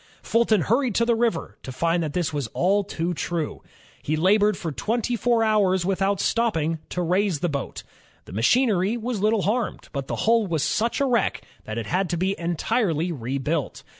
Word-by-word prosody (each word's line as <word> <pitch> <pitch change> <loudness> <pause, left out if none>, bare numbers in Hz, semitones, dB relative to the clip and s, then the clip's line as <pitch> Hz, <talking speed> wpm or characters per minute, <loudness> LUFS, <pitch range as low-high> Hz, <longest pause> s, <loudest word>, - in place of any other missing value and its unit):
Fulton 225 -3 +2
hurried 235 - +1
to 235 - +3
the 235 - +3
river, 225 -7 -1
to 130 - -7
find 165 +6 0
that 155 -3 -3
this 175 -3 -1
was 145 -5 -2
all 200 +3 +2
too 175 -2 -3
true. 165 -1 -3 0.4
He 155 - -1
labored 205 +5 +3
for 165 - -4
twenty 225 - -1
four 235 +1 +2
ho^rs 200 -5 +2
without 195 0 +1
stopping, 165 -9 0
to 180 - -2
raise 180 -2 +1
the 175 - +1
boat. 140 -3 -4 0.4
The - - -11
machinery 205 - +2
was 235 -3 -3
little 215 -1 +2
harmed, 220 +3 -2
but 140 -2 -4
the - - -2
hull 225 -2 +3
was 160 -4 0
such 230 - 0
a - - +3
wreck 240 -5 0 0.2
that 110 +1 -5
it 115 - -3
had 180 - 0
to 175 - -1
be 190 +3 0
entirely 175 0 0
rebuilt. 140 +2 -3
185 Hz, 190 wpm, -24 LUFS, 160-225 Hz, 0.4 s, to